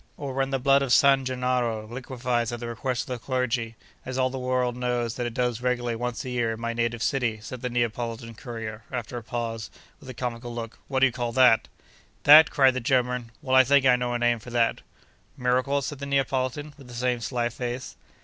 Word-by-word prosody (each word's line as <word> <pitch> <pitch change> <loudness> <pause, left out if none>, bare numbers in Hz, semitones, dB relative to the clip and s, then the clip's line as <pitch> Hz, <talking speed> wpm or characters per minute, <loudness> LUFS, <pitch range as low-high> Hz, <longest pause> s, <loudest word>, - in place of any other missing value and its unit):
'Or 140 -3 -5
when 135 0 0
the 135 - 0
blood 135 +1 +4
of 135 -3 -1
San 135 0 +5
Gennaro 125 -3 -1
liquefies 120 -1 -2
at 120 - -5
the 120 - -5
request 120 +2 -2
of 125 -4 -5
the - - -27
clergy—as 125 0 -3
all 130 -1 +2
the 130 - -4
world 125 -1 0
knows 125 -2 -1
that 120 0 -3
it 120 - -7
does 125 -2 0
regularly 120 -2 0
once 120 +1 -4
a 130 - -4
year, 120 -2 0
in 110 - -8
my 115 0 -2
native 115 0 -1
city,' 120 -6 0
said 120 +3 -8
the 125 - -2
Neapolitan 115 -1 -2
courier 115 -2 -7
after 125 -2 -4
a - - -5
pause, 115 -1 -4 0.3
with - - -13
a 130 - -7
comical 120 -1 -4
look, 115 -1 -6
'what 135 -1 -1
do - - +8
you 135 - +2
call 120 -1 -3
that?' 125 -3 +5 0.6
'That!' 150 +2 +9
cried 135 -2 +4
the 130 - -2
German. 125 -1 0
'Well, 130 -2 +1
I 130 - +8
think 140 +1 +4
I 125 -1 +6
know 125 0 -2
a - - +2
name 120 -1 +2
for 115 - -11
that.' 120 -1 +1 0.6
'Miracle?' 130 +2 +1
said 140 +1 -5
the 140 - -5
Neapolitan, 135 +1 -1
with 135 - -13
the 120 - -10
same 125 0 0
sly 120 +1 -1
face. 125 +1 -5
125 Hz, 220 wpm, -26 LUFS, 120-130 Hz, 0.6 s, That